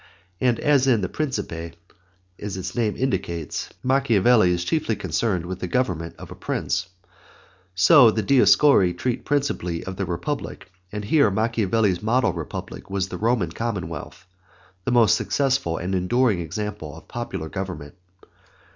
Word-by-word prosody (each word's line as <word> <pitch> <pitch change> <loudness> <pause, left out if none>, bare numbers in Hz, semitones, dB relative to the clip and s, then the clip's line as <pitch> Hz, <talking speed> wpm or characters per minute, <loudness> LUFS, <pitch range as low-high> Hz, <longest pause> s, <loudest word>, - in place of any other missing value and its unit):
And 125 -2 +2
as 140 -3 +3
in 120 -5 +3
the 95 - -1
Principe, 85 - -4 0.6
as 100 -2 -5
its 95 0 -5
name 110 -3 0
indicates, 85 -10 -2
Machiavelli 120 -6 +4
is 85 -1 0
concerned 105 - -1
chiefly - - -8
with 95 0 -5
the 90 - -3
government 85 -6 -1
of - - -11
a - - -8
Prince, - - -2 0.9
so 120 - +7
the 110 0 -1
Discorsi 130 -8 +5
treat 125 +4 -2
principally 135 -13 -1
of 95 0 -7
the 95 - -2
Republic, 95 - -4 0.2
and 105 0 -5
here 140 0 +4
Machiavelli's 110 -2 +1
model 120 +4 +2
republic - - -7
was 95 -1 -2
the - - -6
Roman 110 -7 +1
commonwealth, 90 -8 -5 0.6
the - - 0
most 120 -3 +5
successful 115 - 0
and 90 +3 -4
most 95 - +1
enduring 110 +2 +2
example 85 -2 -5
of 85 - -15
popular 120 -9 -5
government. 90 -5 -6
105 Hz, 145 wpm, -23 LUFS, 90-125 Hz, 0.9 s, so